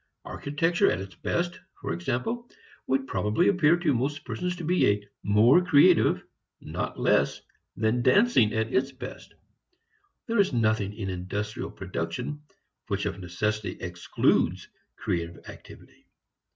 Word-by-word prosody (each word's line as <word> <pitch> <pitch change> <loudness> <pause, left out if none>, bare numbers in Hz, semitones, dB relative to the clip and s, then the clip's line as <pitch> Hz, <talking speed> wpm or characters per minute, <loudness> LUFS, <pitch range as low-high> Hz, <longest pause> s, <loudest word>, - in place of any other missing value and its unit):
Architecture 165 +5 +1
at 85 - -1
its 95 -1 -8
best, 175 - -2 0.2
for - - -3
example, 125 - -3 0.4
would 135 0 +1
probably 110 +6 +1
appear 175 -4 +4
to 170 -5 +1
most 140 +4 -2
persons 180 +10 -3
to 175 - -7
be 105 - +2
more 110 - +5
creative, 180 +1 +5 0.4
not - - -5
less, - - +2 0.4
than 110 +3 +1
dancing 130 - +4
at 110 +2 -1
its 135 +2 +1
best. 130 0 -10 0.9
There 230 -2 0
is 195 -7 +3
nothing 110 -4 +1
in 100 -3 -4
industrial 100 +4 -4
production 120 - -5 0.5
which - - -2
of - - -3
necessity 105 +4 -2
excludes 85 -1 0 0.3
creative 85 -1 -3
activity. - - -14
125 Hz, 125 wpm, -27 LUFS, 100-165 Hz, 0.9 s, more